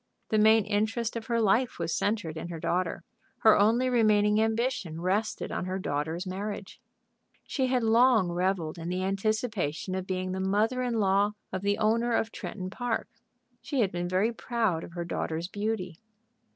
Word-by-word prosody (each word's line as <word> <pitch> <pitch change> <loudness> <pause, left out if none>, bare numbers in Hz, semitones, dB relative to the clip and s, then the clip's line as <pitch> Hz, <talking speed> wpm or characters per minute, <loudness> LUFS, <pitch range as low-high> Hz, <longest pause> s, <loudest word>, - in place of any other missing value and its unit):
The 215 - +2
main 220 0 +5
interest 220 +3 -1
of 230 -1 -5
her 235 -1 +1
life 225 +4 +2
was 165 -1 -2
centred 205 -7 -1
in 160 - -5
her 170 -2 -6
daughter. 175 0 -1 0.4
Her 220 - +7
only 230 +5 +3
remaining 215 -3 +3
ambition 225 -7 -1
rested 195 +5 -1
on - - -2
her 185 +1 -2
daughter's 160 +1 -2
marriage. 195 +1 -5 0.6
She 265 -2 -1
had 255 -2 +1
long 225 -4 +4
revelled 175 -2 -1
in 165 +1 -5
the 185 +1 -1
anticipation 195 -4 -1
of 185 0 -3
being 185 0 -2
the 190 - -3
mother 210 +6 +1
in 245 -2 -1
law 200 0 +2 0.2
of 190 - -2
the 200 +1 +1
owner 230 +2 +2
of 225 - 0
Tretton 185 -2 -6
Park. 245 0 -2 0.5
She 275 -4 -1
had 195 -4 +1
been 175 0 -2
very 195 +6 +1
proud 225 -8 -1
of 170 - -10
her 170 -1 -4
daughter's 165 0 -3
beauty. 205 -4 -3
205 Hz, 175 wpm, -28 LUFS, 185-225 Hz, 0.6 s, Her